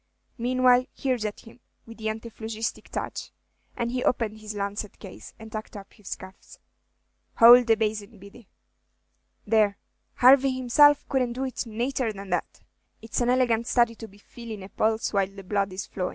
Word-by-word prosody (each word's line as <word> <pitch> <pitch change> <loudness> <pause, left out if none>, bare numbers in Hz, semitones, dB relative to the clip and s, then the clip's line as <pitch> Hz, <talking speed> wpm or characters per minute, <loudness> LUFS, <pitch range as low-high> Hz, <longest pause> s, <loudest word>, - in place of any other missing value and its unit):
Meanwhile, 250 +1 +3
here's 255 -5 -1
at 210 - -5
him, 230 +1 -16 0.3
with 230 0 -12
the 220 - -4
antiphlogistic 220 0 -5
touch;" - - -5 0.5
and 235 0 -2
he 250 0 -2
opened 220 -3 0
his 215 0 -7
lancet 200 +1 -4
case, 195 -3 -12
and 220 -1 -12
tucked 215 -1 -7
up 195 -1 -12
his 210 -4 -7
cuffs. 190 0 -14 0.8
"Houlde 240 +1 +8
the 225 - +5
basin, 215 0 -3
Biddy." 200 +3 -15 1.0
"There, 210 -2 +2 0.4
Harvey 265 +1 +6
himself 280 +3 +4
couldn't 255 -3 0
do 260 +2 -4
it 260 -2 -4
nater 240 +2 -2
than 195 -1 -9
that. 180 - -3 0.4
It's 225 +2 -3
an 240 - +1
elegant 240 -2 +2
study 235 -2 +3
to 225 0 -10
be 200 -1 -19
feelin' 220 -1 -10
a 190 - -10
pulse 220 +1 0
while 195 -1 +2
the 195 0 -12
blood 195 0 -1
is 185 0 -5
flowin'. 180 -2 -4
225 Hz, 170 wpm, -26 LUFS, 205-245 Hz, 1.0 s, Houlde